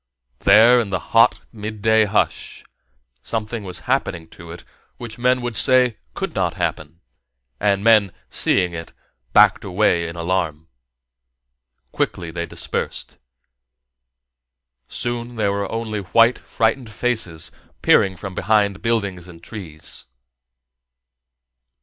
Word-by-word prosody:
There, 115 +5 +6
in 115 -4 -2
the 95 - 0 0.2
hot - - +5
midday 110 0 +1
hush, 105 +1 -1 0.6
something 110 - -4
was 90 -2 -4
happening 95 -11 -2
to 85 -2 -13
it 85 +1 -10 0.3
which 120 -2 -9
men 125 +1 +2
would 120 -2 -3
say 125 +1 +5 0.2
could - - -4
not - - -1
happen; 75 +3 -4 0.6
and 100 -1 +1
men, 110 -4 +5 0.2
seeing 90 -2 0
it, 80 -1 -8 0.4
backed - - +5
away 90 -3 +1
in 85 - -7
alarm. 85 -3 -2 1.2
Quickly 85 -2 -3
they 85 0 -4
dispersed. - - -5 1.7
Soon 120 0 -3
there 105 -3 0
were 100 -1 -3
only 115 -2 -3
white, 115 +5 +3
frightened 115 +2 -1
faces 105 -8 -2 0.3
peering 95 -1 +4
from 95 0 -7
behind 100 -1 +1
buildings 100 -6 -2
and 85 -2 -14
trees. 85 -8 -9
100 Hz, 115 wpm, -21 LUFS, 90-115 Hz, 1.7 s, There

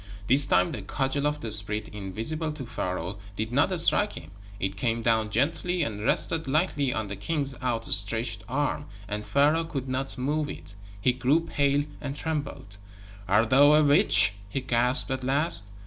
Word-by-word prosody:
This 135 +5 +5
time 90 -5 +2
the 105 - -5
cudgel 135 +7 -1
of 150 0 -3
the 110 - -5
spirit 105 +1 -2
invisible 110 - -3
to 145 -4 -7
Pharaoh 95 -3 -4 0.2
did 110 +2 -4
not 165 +8 +1
strike 205 +5 +2
him: 80 0 -10 0.3
it 95 +1 -3
came 115 +3 -1
down 110 -2 +1
gently 165 - 0
and 105 -6 -4
rested 160 +6 +1
lightly 145 -2 0
on 110 -3 -3
the 100 - -5
king's 140 +6 -2
out 120 -3 -2
stretched 110 +2 0
arm. 145 +2 -2 0.2
And 105 +1 -4
Pharaoh 145 +9 +2
could 135 -5 -5
not 130 +2 -3
move 145 +4 -1
it. 80 +4 -10 0.3
He 125 +5 +2
grew 135 +6 +2
pale 145 -3 0 0.2
and 140 -1 -5
trembled. 145 -10 -5 0.5
"Art 110 +5 +2
thou 145 +3 +6
a 155 0 +5
witch?" 145 -7 +5 0.2
he 135 +6 -3
gasped, 125 +2 +2
at 130 0 -3
last. 135 - +2
130 Hz, 175 wpm, -26 LUFS, 105-145 Hz, 0.5 s, thou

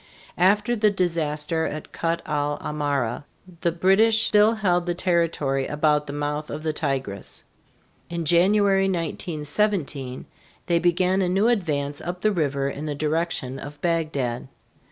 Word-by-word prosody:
After 205 +6 +3
the 215 -1 +3
disaster 165 -4 -1
at 155 0 -7
Kut 165 0 -2
el 145 0 -1
Amara 145 -5 -2 0.4
the 170 - +2
British 210 +6 +4
still 215 +2 +4
held 180 -5 +1
the 175 - 0
territory 165 -7 0
about 150 0 +1
the - - -4
mouth 145 +1 -3
of 155 +1 -6
the 155 -1 -1
Tigris. 135 -10 -3 0.7
In 170 -1 -3
January, 195 +4 +4
1917, 155 -4 -2 0.4
they 170 -2 +2
began 180 +2 +2
a 180 - +1
new 195 +5 +2
advance 145 -10 -1
up 180 +1 -5
the 215 - +3
river 140 -6 0
in 145 +2 -5
the 145 - -2
direction 155 -3 -2
of 145 +1 -9
Bagdad. 155 -8 -1
165 Hz, 140 wpm, -24 LUFS, 145-185 Hz, 0.7 s, British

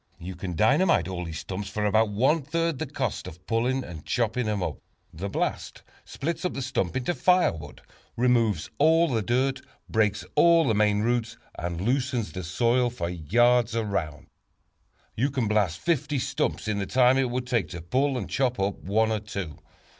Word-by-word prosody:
You 90 +2 -7
can 90 0 -5
dynamite 125 - +3
all 90 -2 -4
those 80 -1 -6
stumps 100 +1 -5
for 105 +1 -2
about 110 +1 +3
one 130 +10 +2
third 165 +1 -1
the - - -3
cost - - -3
of 90 +4 -11
pulling 125 +3 0
and 80 -7 -9
chopping 120 0 -1
them 105 -3 -1
up. - - -4 0.3
The 95 +5 -5
blast - - -3 0.2
splits 165 +6 -4
up 180 - -2
the 135 - -3
stump 120 -8 -1
into 130 +7 -1
firewood, 170 - +1 0.3
removes 120 -3 +2
all 160 +3 +5
the 115 -4 0
dirt, 130 +5 0 0.3
breaks 105 -3 +1
all 170 -2 +5
the 115 - +3
main 105 -1 +2
roots, 120 0 -1 0.2
and 85 0 -4
loosens 125 - 0
the 95 +4 -6
soil 120 +8 +1
for 85 -8 -4
yards 115 +8 +2
around. 100 -9 -2 0.9
You 130 +6 +1
can 130 -5 -1
blast 105 -6 +1
fifty 150 -3 0
stumps 125 - -2
in 105 -1 -1
the 100 - -3
time 130 +1 +4
it 130 -2 +1
would 125 +1 -2
take 120 -10 0
to 85 - -6
pull 130 +9 +1
and 110 - -4
chop 125 -4 0
up 95 +1 -1
one 110 +3 +1
or 110 - 0
two. 100 -7 -6
115 Hz, 185 wpm, -26 LUFS, 95-130 Hz, 0.9 s, all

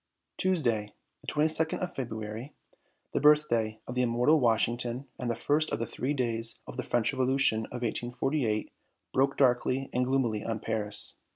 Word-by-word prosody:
Tuesday, 120 - 0 0.3
the - - -17
22nd 160 +1 +1
of 180 -1 -4
February, 110 +1 -6 0.6
the - - 0
birthday 120 -8 +3
of 125 - -4
the 125 - +1
immortal 125 +6 +3
Washington 120 +1 +1
and 125 - -2
the 115 - 0
first 150 +6 +1
of - - 0
the 115 - -2
Three 135 +5 -2
Days 115 -3 +1
of - - -8
the 125 - -2
French 120 -3 0
Revolution 130 -4 +2
of 125 0 -6
1848, 120 0 -1 0.4
broke 135 +1 +2
darkly 130 0 +2
and 125 - +2
gloomily 120 -6 0
on 115 -1 -2
Paris. 105 -2 -1
125 Hz, 160 wpm, -29 LUFS, 115-135 Hz, 0.6 s, birthday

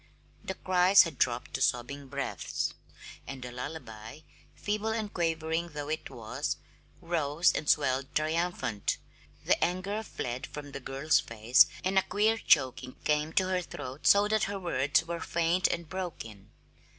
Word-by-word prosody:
The 190 - -4
cries 185 +1 +5
had 165 -6 -6
dropped 120 -1 0
to 135 - -3
sobbing 135 +1 0
breaths, 140 +1 -3 0.5
and 135 -2 -7
the 125 - -6
lullaby, 125 -1 -7 0.3
feeble 210 +1 -2
and 220 -2 -2
quavering 165 0 -1
though 145 0 -5
it 155 0 -3
was, 110 -2 -4 0.4
rose 165 -1 +2
and 150 - -2
swelled 135 -1 +1
triumphant. 155 - 0 0.5
The - - +3
anger 185 +4 -1
fled 125 - -5
from 145 -1 -8
the 140 - -6
girl's 140 +4 +1
face, 115 +2 +4 0.2
and 190 +1 +3
a - - +2
queer 215 +4 +1
choking 130 -6 +2
came 150 +1 +1
to 185 - +3
her 185 -1 +1
throat 140 -4 -5
so 200 +1 +6
that 215 0 +2
her 200 0 -3
words 145 -3 +1
were 170 0 -4
faint 170 +2 +1
and 170 -1 -3
broken. 160 - -6
155 Hz, 150 wpm, -30 LUFS, 130-180 Hz, 0.5 s, so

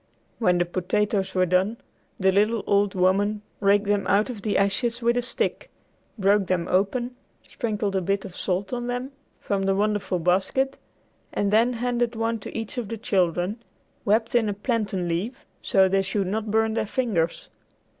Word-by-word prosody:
When 180 -6 +3
the 175 - +2
potatoes 190 +2 -1
were 185 0 +4
done, 185 +5 +1 0.4
the 190 -1 +4
little 210 +3 +2
old 200 -1 +2
woman 200 +3 +2 0.2
raked 205 0 +3
them 205 -1 +1
out 205 +6 +2
of 220 -5 -8
the 210 0 0
ashes 230 +5 +1
with 235 0 +2
a 245 - +2
stick, 245 - -2 0.5
broke 200 -1 +3
them 180 -1 0
open, 240 +7 0 0.3
sprinkled 210 -4 -2
a 190 - +2
bit 195 +2 -1
of 185 -3 -9
salt 190 +4 -2
on 240 0 -2
them 245 +2 -3 0.3
from 200 -1 -1
the 195 0 +1
wonderful 205 -2 0
basket, 190 +10 +1 0.5
and 200 0 0
then 235 +3 +4
handed 240 0 -1
one 225 0 -1
to 200 - -7
each 225 +2 -4
of 235 - -4
the 230 - -4
children, 185 +1 0 0.4
wrapped 220 +2 +1
in 230 -3 +3
a 205 - -2
plantain 205 -5 -1
leaf, 185 +9 -3 0.2
so 190 -1 +4
they 195 +1 +2
should 195 +1 -1
not 210 +3 -2
burn 220 +1 +2
their 220 - -1
fingers. 200 -10 -1
205 Hz, 175 wpm, -25 LUFS, 190-230 Hz, 0.5 s, were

